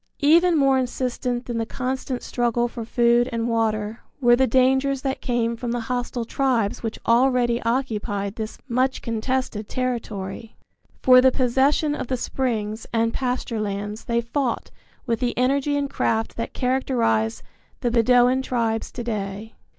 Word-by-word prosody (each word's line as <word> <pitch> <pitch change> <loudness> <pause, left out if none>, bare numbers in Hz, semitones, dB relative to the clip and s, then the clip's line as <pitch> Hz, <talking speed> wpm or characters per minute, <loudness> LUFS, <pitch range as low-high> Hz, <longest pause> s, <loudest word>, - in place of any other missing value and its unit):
Even 335 +3 +5
more 270 -2 +4
insistent 250 -1 -2
than 235 -2 -3
the 225 - -1
constant 255 0 -3
struggle 240 0 0
for 235 -1 -6
food 240 +2 +3
and 230 0 -1
water 220 -1 -1 0.2
were 240 -3 +5
the 260 +1 +3
dangers 265 +2 +2
that 270 -1 -2
came 235 -1 0
from 235 +1 -4
the 240 0 -1
hostile 245 0 -3
tribes 235 -5 0
which 225 -2 -4
already 240 0 +3
occupied 215 -5 -1
this 220 -1 -5
much 260 +1 0
contested 230 -2 -2
territory. 225 -4 -4 0.5
For 255 0 +8
the 260 0 +5
possession 270 +4 +2
of 275 - -4
the 255 - -1
springs 220 -4 -2
and 230 0 +1
pasture 250 -3 -2
lands 205 +1 -4
they 235 0 +1
fought 240 +1 -2 0.3
with 230 -4 -1
the 245 -1 -1
energy 275 +3 +1
and 285 0 0
craft 225 -4 -1
that 230 - -4
characterize 245 - 0 0.4
the 240 - 0
Bedouin 245 +2 +4
tribes 230 -4 -1
to 240 - -5
day. 210 -1 -4
240 Hz, 150 wpm, -23 LUFS, 225-260 Hz, 0.5 s, For